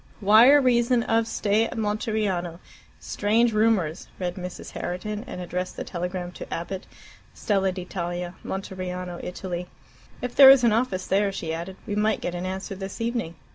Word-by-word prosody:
"Wire 225 +8 +7
reason 245 -2 +3
of 225 -1 +1
stay 215 0 +1
at - - -8
Monteriano. 210 -5 -1 0.4
Strange 225 +3 +1
rumours," 210 -7 +1
read 180 -2 -2
Mrs. 180 -1 -7
Herriton, 210 +4 -4
and - - -6
addressed 180 +1 -4
the - - -3
telegram 180 0 -4
to - - -10
Abbott, 185 +3 -5 0.5
Stella 195 -3 +1
d'Italia, 175 -1 -4
Monteriano, 180 -2 -5
Italy. 180 -1 -5 0.5
"If 250 -1 -4
there 270 -1 +10
is 270 -2 +8
an 230 -2 +4
office 220 -5 0
there," 200 +1 +2
she 165 -4 -4
added, 170 +3 -5
"we 205 - -4
might 215 +1 +1
get 175 - -3
an 180 +1 -3
answer 190 +2 -4
this 195 +2 -7
evening. 230 -7 -2
195 Hz, 160 wpm, -25 LUFS, 180-220 Hz, 0.5 s, there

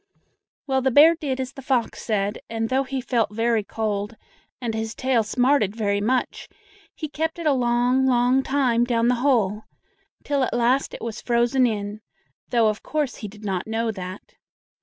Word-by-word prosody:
Well, 265 -1 +1
the 265 - +2
bear 295 +6 +7
did 285 -5 -3
as 260 +1 -4
the 270 - -9
fox 260 -3 -1
said, 205 -1 -1
and 225 0 -2
though 265 +1 +2
he 265 0 -3
felt 240 -3 0
very 225 0 +1
cold, 210 0 -3 0.4
and 235 -3 -3
his 220 0 -3
tail 260 -3 +1
smarted 245 -1 +1
very 205 -2 0
much, 250 +4 -1 0.5
he 310 - -5
kept 320 +3 -3
it 335 - -6
a 300 - +4
long, 250 +1 +2
long 250 +1 +3
time 260 -4 +1
down 235 -1 +1
in - - +4
the - - +4
hole, 220 -6 +1 0.6
till 285 -1 0
at 255 - 0
last 245 +3 +1
it - - -9
was 225 -1 -5
frozen 240 +2 +2
in, 210 -1 -4 0.5
though 235 -3 +3
of 215 0 -1
course 300 -4 -2
he 210 - -6
did 210 +1 -12
not 190 -1 -2
know 225 +1 -1
that. 185 -1 -8
240 Hz, 185 wpm, -23 LUFS, 220-265 Hz, 0.6 s, bear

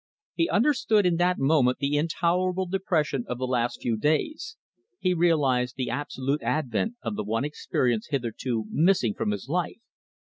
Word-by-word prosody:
He 335 - 0
understood 225 -4 +3
in 175 -2 +2
that 180 +1 +2
moment 135 -3 +3
the 140 +1 -1
intolerable 175 +4 0
depression 165 -8 0
of 125 - -3
the 130 - -2
last 120 -1 -1
few 115 -2 0
days. 305 - -1 0.4
He 185 - +1
realised 140 -8 +2
the 130 -2 -2
absolute 145 0 -2
advent 155 - -1
of 110 - -3
the 105 - -3
one 115 +5 -1
experience 125 -6 -1
hitherto 120 -4 -2
missing 160 - +3
from - - -2
his 105 +3 -3
life. 175 +4 -2
145 Hz, 155 wpm, -26 LUFS, 125-180 Hz, 0.4 s, understood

